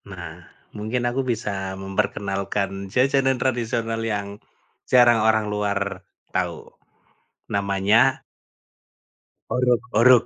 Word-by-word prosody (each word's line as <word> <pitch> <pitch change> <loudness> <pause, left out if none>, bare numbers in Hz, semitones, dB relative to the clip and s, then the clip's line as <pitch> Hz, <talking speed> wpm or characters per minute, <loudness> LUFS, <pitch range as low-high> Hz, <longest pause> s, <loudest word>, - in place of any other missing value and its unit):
Nah, - - -8 0.3
mungkin 110 +4 -2
aku 120 +2 0
bisa 100 -6 -3
memperkenalkan 95 0 -2
jajanan 135 +3 +2
tradisional 115 -3 -1
yang, 100 -2 -3 0.5
jarang 120 -3 +6
orang 110 0 +3
luar, 100 -2 -2 0.3
tahu, 85 -3 -3 0.8
namanya 100 +6 +2 1.3
orog-orog. 125 -1 +4
110 Hz, 80 wpm, -23 LUFS, 100-120 Hz, 1.3 s, jarang